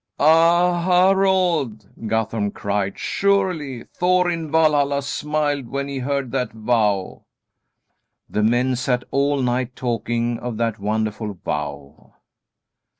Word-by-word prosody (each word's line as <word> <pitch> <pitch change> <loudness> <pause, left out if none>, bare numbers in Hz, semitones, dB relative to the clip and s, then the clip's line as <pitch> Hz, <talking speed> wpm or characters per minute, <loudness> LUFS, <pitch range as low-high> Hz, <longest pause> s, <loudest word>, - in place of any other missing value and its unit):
"Ah, 170 +3 +4
Harald!" 180 - +2 0.2
Guthorm 110 -1 -1
cried, 100 -1 -2
"surely 180 -11 0
Thor 180 0 +2
in 165 -2 -4
Valhalla 145 -3 +2
smiled 145 -1 -2
when 140 0 -3
he 140 -1 -4
heard 135 -1 -2
that 130 -2 -1
vow." 110 -4 -1 1.0
The 105 - -1
men 120 +4 +2
sat 125 0 -1
all 140 0 +1
night 125 +1 -1
talking 120 -1 -2
of 120 -3 -5
that 115 -2 -1
wonderful 110 0 -2
vow. 75 -3 -6
130 Hz, 110 wpm, -21 LUFS, 110-155 Hz, 1.0 s, Ah